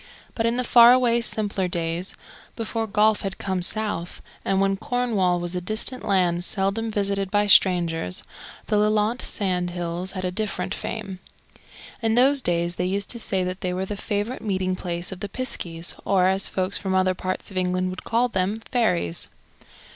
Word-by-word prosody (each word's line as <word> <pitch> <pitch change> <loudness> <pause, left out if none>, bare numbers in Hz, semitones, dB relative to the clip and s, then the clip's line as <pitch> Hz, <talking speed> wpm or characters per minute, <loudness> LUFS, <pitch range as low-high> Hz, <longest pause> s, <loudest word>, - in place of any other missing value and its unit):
But 225 0 0
in 235 +1 0
the 250 - +1
far 235 0 +8
away 240 -2 +3
simpler 205 -5 0
days, 170 +1 -2 0.4
before 225 0 -3
golf 215 +1 +3
had 195 -1 -4
come 190 -2 -2
south, 180 -3 -1 0.2
and 195 - +1
when 195 0 +2
Cornwall 205 -5 0
was 175 +1 -4
a 180 - -2
distant 215 +7 -2
land 180 -4 +1
seldom 195 +4 0
visited 200 -2 -1
by 205 +1 +2
strangers, 170 - +3 0.4
the 210 - +1
Lelant 215 +3 +2
sand 180 -4 -1
hills 175 +1 -3
had 185 -1 -4
a 180 - -1
different 210 +2 -2
fame. 200 -4 -5 0.8
In 225 -1 +1
those 270 +3 +6
days 170 -3 0
they 180 - 0
used 195 +2 -1
to 235 - -4
say 190 -4 0
that 185 +1 -4
they 180 -1 -2
were 190 +1 -2
the 205 - -4
favourite 210 +4 -3
meeting 185 -3 -1
place 175 -1 -3
of 190 - -7
the 205 - -5
piskies, 175 -8 -3
or, 190 -2 +2
as 190 +1 +2
folks 185 +1 -1
from 190 -1 -2
other 185 0 +3
parts 185 +2 -4
of 190 - -7
England 185 0 0
would 185 - -8
call 235 +2 +1
them, 190 -2 -1 0.2
fairies. 180 - 0
195 Hz, 180 wpm, -24 LUFS, 180-215 Hz, 0.8 s, far